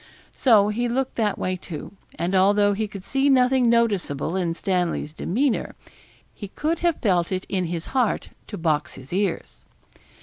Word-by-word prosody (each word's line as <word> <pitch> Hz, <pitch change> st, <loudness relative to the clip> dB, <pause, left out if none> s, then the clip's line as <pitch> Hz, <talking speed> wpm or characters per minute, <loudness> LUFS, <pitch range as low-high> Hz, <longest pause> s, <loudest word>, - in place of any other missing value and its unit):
So 215 Hz, -6 st, +4 dB
he 240 Hz, +3 st, -1 dB
looked 260 Hz, +2 st, -1 dB
that 215 Hz, -3 st, +1 dB
way 185 Hz, 0 st, -1 dB
too; 175 Hz, -4 st, -8 dB, 0.3 s
and 175 Hz, +3 st, -2 dB
although 205 Hz, +2 st, +4 dB
he 215 Hz, +2 st, -2 dB
could 200 Hz, -2 st, -9 dB
see 270 Hz, +6 st, +1 dB
nothing 255 Hz, -2 st, +4 dB
noticeable 200 Hz, -9 st, +1 dB
in 175 Hz, -3 st, -1 dB
Stanley's 175 Hz, -5 st, -1 dB
demeanour, 240 Hz, -, -1 dB, 0.6 s
he 205 Hz, -, -8 dB
could 310 Hz, -, -2 dB
have 345 Hz, -2 st, +2 dB
felt 180 Hz, -5 st, +2 dB
it 185 Hz, 0 st, -2 dB
in 185 Hz, -2 st, -1 dB
his 170 Hz, -1 st, -4 dB
heart 250 Hz, -5 st, 0 dB, 0.2 s
to 205 Hz, -, -6 dB
box 155 Hz, -3 st, -1 dB
his 135 Hz, +5 st, -11 dB
ears. 195 Hz, -2 st, -2 dB
200 Hz, 165 wpm, -23 LUFS, 175-240 Hz, 0.6 s, So